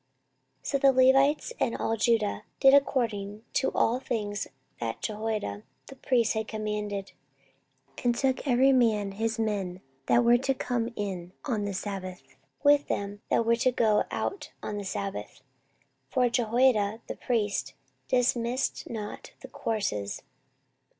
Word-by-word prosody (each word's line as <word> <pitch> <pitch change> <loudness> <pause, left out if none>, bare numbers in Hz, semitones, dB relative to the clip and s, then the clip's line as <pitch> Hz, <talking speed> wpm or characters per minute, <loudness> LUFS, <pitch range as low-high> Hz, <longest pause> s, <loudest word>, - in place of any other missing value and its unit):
14:023:008 - - -26
So 280 - +2
the 275 0 +6
Levites 270 - +4
and 230 - 0
all 225 - 0
Judah 225 -2 +1 0.2
did 270 0 +7
according 220 -7 +1
to 265 - +1
all 240 +3 +2
things 210 -5 -3 0.3
that 115 -1 -3
Jehoiada 215 - -3 0.3
the 270 - -10
priest 245 -3 +1
had 220 -1 -2
commanded, 210 -2 -3 0.9
and 240 -1 +2
took 265 +2 0
every 260 +1 +5
man 215 -5 +2
his 220 +3 -2
men 200 -5 -2 0.3
that 240 - +4
were 240 +1 +5
to 270 +1 0
come 240 -2 -2
in 185 -3 -4
on 220 -7 -1
the 200 - -3
sabbath, 185 -2 -5 0.4
with 290 0 +5
them 200 +1 -3
that 230 - +2
were 235 +1 +3
to 255 +2 +2
go 220 -3 +2
out 390 - -3
on 210 - -3
the 200 - -6
sabbath: 190 - -5 0.7
for 245 - +2
Jehoiada 230 -2 +2
the - - -5
priest 215 -5 -1 0.3
dismissed 245 0 0
not 215 -3 -6
the - - -9
courses. 145 - -3
225 Hz, 145 wpm, -28 LUFS, 205-250 Hz, 0.9 s, did